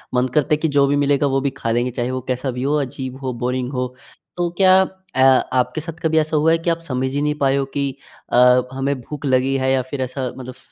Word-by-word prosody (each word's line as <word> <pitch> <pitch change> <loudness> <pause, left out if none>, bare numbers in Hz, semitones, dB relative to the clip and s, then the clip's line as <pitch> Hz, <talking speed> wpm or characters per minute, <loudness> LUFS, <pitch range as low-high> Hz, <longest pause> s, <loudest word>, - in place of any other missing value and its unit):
मन 125 +1 +2
करता 150 0 +2
है 150 - +4
कि 160 - 0
जो 140 - +6
भी 140 - +1
मिलेगा 145 0 +2
वो 135 - +3
भी 140 - 0
खा 115 - -2
लेंगे, 120 +2 0
चाहे 120 +1 -2
वो 130 0 -3
कैसा 130 +1 -2
भी 125 +1 -4
हो, 145 +2 +1
अजीब 130 0 -6
हो, 130 -1 -3
बोरिंग 125 +1 -1
हो। 125 0 -1 0.5
तो 175 -1 0
क्या 190 -1 +6 0.3
अ, 130 - +2 0.3
आपके 130 +5 0
साथ 165 +2 -7
कभी 160 0 +1
ऐसा 155 0 +1
हुआ 160 +2 +3
है 165 - +4
कि 165 +1 -2
आप 165 - 0
समझ 130 0 -1
ही 145 +1 -1
नहीं 150 0 +1
पाए 135 -1 +2
हो 135 - 0
कि 140 -1 0 0.4
अ, 125 +1 +6
हमें 135 +1 -1
भूख 150 +3 -8
लगी 130 0 +2
है, 130 0 +1
या 135 -1 +2
फिर 140 -2 -3
ऐसा 130 +1 -3
मतलब 130 -1 -8
स - - -23
135 Hz, 265 wpm, -20 LUFS, 130-150 Hz, 0.5 s, जो